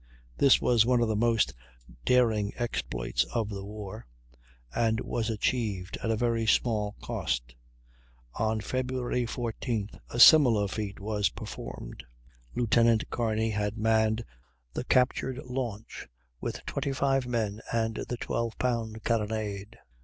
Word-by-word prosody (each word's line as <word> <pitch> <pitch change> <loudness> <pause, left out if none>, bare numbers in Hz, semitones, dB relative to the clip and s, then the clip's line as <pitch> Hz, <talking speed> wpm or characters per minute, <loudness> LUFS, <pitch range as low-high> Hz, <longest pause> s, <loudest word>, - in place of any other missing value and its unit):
This 140 -2 +5
was 120 -3 +4
one 125 +1 +3
of - - +1
the 110 - +1
most 115 -1 +2 0.5
daring 110 -5 +3
exploits 90 - -1
of 115 -3 0
the 100 -2 -5
war, 100 - -8 0.7
and 115 -1 +1
was 115 -1 -2
achieved 105 -4 -1
at 115 -1 0
very 115 -1 0
small 105 -3 +2
cost. - - -2 0.8
On 110 0 0
Feb. 130 +3 -2 0.4
14th 115 -2 -3
a 120 - -4
similar 120 -8 +8
feat 105 0 -4
was 105 0 0
performed. - - -8 0.5
Lieutenant 115 -1 +3
Kearney 110 -1 0
had 105 +1 -2
manned 110 +1 +2 0.5
the - - -3
captured 130 0 +2
launch 120 -4 -5 0.3
with - - -5
25 135 -1 0
men 110 -3 -1
and 115 -1 0
the 120 - -2
12 115 -1 -2
pound 115 -3 -2
carronade. 105 -3 -2
110 Hz, 125 wpm, -29 LUFS, 105-120 Hz, 0.8 s, similar